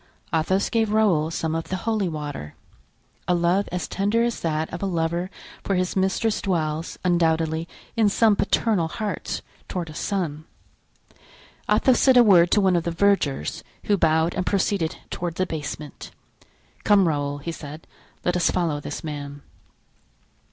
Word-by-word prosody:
Athos 175 +5 +1
gave 225 -3 +1
Raoul 195 -8 +3
some 160 -1 -2
of 165 0 -2
the 185 - -3
holy 210 0 -1
water. 145 - -6 0.7
A 180 - +3
love 175 +3 +1
as 180 0 -3
tender 205 +4 +1
as 235 -1 -1
that 160 -1 -1
of 175 - -5
a 200 - 0
lover 170 0 -1 0.3
for 195 - 0
his 180 0 -1
mistress 195 +3 +1
dwells, 160 -3 -2
undoubtedly, 165 -2 +1 0.3
in 220 -3 +4
some 215 +1 +4
paternal 200 -3 +1
hearts 210 +5 -4 0.2
toward 170 -4 -4
a - - -10
son. 155 -4 -3 1.2
Athos 260 -3 +4
said 260 -2 +5
a 245 - +9
word 180 -5 +6
to 210 - +4
one 190 -2 +3
of 170 - +1
the 170 - -1
vergers, 165 - +1 0.2
who 205 - +2
bowed 160 -1 +2
and 185 - -2
proceeded 195 -4 0
toward 175 -2 -3
the 185 - 0
basement. 150 -3 -6 0.7
"Come, 200 -3 +5
Raoul," 145 -2 -1
he 145 +4 -5
said, 155 0 -9 0.4
"let 180 - +1
us 180 - +2
follow 165 -5 0
this 145 - -6
man." 145 -2 -6
175 Hz, 160 wpm, -24 LUFS, 160-200 Hz, 1.2 s, a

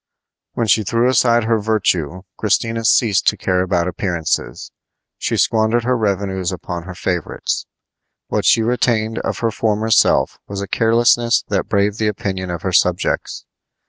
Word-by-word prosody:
When 115 - -1
she 110 0 +3
threw 115 +4 +1
aside 120 -2 +3
her 115 0 +1
virtue 95 -5 -1
Christina 115 +2 -1
ceased 110 -3 +3
to - - +3
care 90 -1 0
about 90 -1 0
appearances. 85 -3 -3 0.5
She - - -1
squandered 110 +1 +2
her 125 +2 +1
revenues 100 -4 -1
upon 85 -2 -6
her 95 -2 -8
favorites. 90 -3 -3 0.6
What - - -2
she 115 - +4
retained 115 -2 0
of - - -3
her 115 -1 +1
former 110 +1 -1
self 110 - +3
was 100 -1 -5
a 100 - -4
carelessness 115 +2 +2
that 100 -1 -1
braved 100 +1 0
the 110 - +1
opinion 100 -4 -3
of 85 -1 -5
her 95 - -2
subjects. 90 0 0
105 Hz, 155 wpm, -18 LUFS, 95-115 Hz, 0.6 s, she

